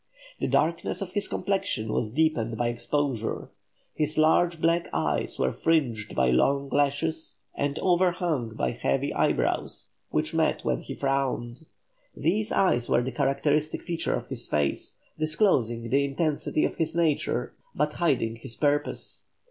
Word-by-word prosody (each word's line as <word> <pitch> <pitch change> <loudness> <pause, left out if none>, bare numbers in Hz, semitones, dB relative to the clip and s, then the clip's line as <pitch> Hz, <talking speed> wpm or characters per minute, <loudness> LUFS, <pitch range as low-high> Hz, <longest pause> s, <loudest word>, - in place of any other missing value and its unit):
The - - 0
darkness 165 +2 +1
of 185 - -8
his 205 +1 -2
complexion 195 - -1
was 105 - -1
deepened 120 -6 +1
by 120 0 +1
exposure; 120 0 -2 0.4
his 155 0 -1
large 165 +2 +4
black 170 +1 +2
eyes - - -1
were 65 - +1
fringed 125 -10 0
by 65 -1 +3
long 140 - +2
lashes 145 +3 0 0.2
and 145 0 -1
overhung 175 -10 +1
by 65 -8 0
heavy 65 +2 -1
eyebrows, - - 0 0.2
which - - -1
met - - +1
when 65 -2 0
he - - -7
frowned; 135 0 -2 0.5
these 205 +8 0
eyes 120 -11 +2
were 120 - +3
the 130 - -3
characteristic 145 +2 0
feature 170 -2 -1
of - - -5
his - - -5
face, 75 -2 -1 0.2
disclosing 140 - +2
the 140 +1 +4
intensity 150 +2 0
of - - -3
his 160 -1 -1
nature, 165 -4 +1 0.2
but 150 - 0
hiding 125 -10 +1
his 115 0 -8
purpose. 145 0 -1
145 Hz, 145 wpm, -27 LUFS, 120-165 Hz, 0.5 s, large